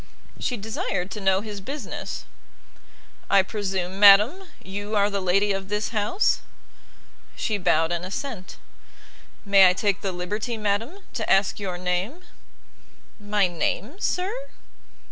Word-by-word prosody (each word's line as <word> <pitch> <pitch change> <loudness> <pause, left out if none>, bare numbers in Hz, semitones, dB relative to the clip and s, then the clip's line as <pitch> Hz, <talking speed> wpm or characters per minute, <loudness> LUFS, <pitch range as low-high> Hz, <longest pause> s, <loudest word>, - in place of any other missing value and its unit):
She 250 -2 -1
desired 200 -3 -3
to 210 - -6
know 190 0 +3
his 210 -2 -7
business. 275 +2 -6 1.0
"I 200 -1 +5
presume, 190 -2 -3
madam, 210 - +7 0.2
you 205 +3 -4
are 205 0 +3
the 200 -1 -1
lady 195 +3 +2
of 195 0 -3
this 210 0 -1
house?" 220 - +1 0.9
She 210 -2 -1
bowed 165 -2 +2
an 170 0 -2
assent. 195 0 -6 0.9
"May 195 -2 +7
I - - +2
take 200 +1 0
the 195 - -2
liberty, 210 +6 -3
madam, 220 - -2
to 220 - -3
ask 195 +1 +3
your 185 -3 -4
name?' 180 - -2 1.0
"My 205 -1 +1
name, 205 - -2
sir?" 370 +2 -1
200 Hz, 130 wpm, -24 LUFS, 190-220 Hz, 1.0 s, madam